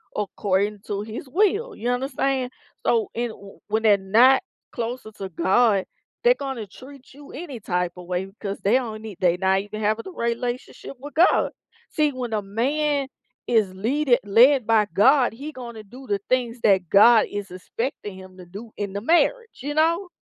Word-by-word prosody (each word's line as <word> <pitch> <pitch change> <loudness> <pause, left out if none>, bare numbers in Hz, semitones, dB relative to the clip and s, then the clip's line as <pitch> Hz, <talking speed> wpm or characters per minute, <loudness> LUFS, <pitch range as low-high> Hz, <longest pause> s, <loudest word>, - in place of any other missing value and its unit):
according 205 0 -1
to 200 -1 -2
his 220 +6 -7
will, 415 - +1
you 240 - -3
understand? 260 0 -1 0.3
So 230 -2 +2
and 240 +1 -1
w 200 -3 -13
when 220 +1 -1
they're 210 -2 +5
not 230 - +4 0.3
closer 235 -1 -5
to 195 -2 -7
God, 195 +4 +2 0.4
they're - - +5
gonna 265 -7 -5
treat 265 +6 -14
you 285 0 -13
any 285 -5 -7
type 180 -3 -2
a 180 - -9
way 180 +1 -2
because 195 0 -7
they 200 - +1
don't 225 -4 -2
need 215 -4 -9
they 175 -1 +2
not 190 +1 +2
even 210 +2 -7
have 215 +1 +1
the - - -9
relationship 240 0 -4
with 290 +1 -10
God. 345 +4 +4 0.4
See, 300 -1 +1
when 250 -3 -5
a 210 -1 -1
man 275 +7 0 0.4
is 215 -6 +2
leaded 245 +6 +1
led 235 +4 +5
by 220 -2 +4
God, 255 +4 +4
he 280 +7 -7
gonna 235 -5 -9
do 250 +6 -13
the 205 -2 0
things 245 -2 0
that 190 -4 +3
God 220 +3 +7
is 205 -1 -5
expecting 205 +3 -5
him 185 0 -13
to 180 - -11
do 205 +6 -10
in 200 -2 -4
the 200 - -4
marriage, 450 - +1
you 290 +3 -3
know? 335 +5 +1
230 Hz, 180 wpm, -23 LUFS, 200-270 Hz, 0.4 s, God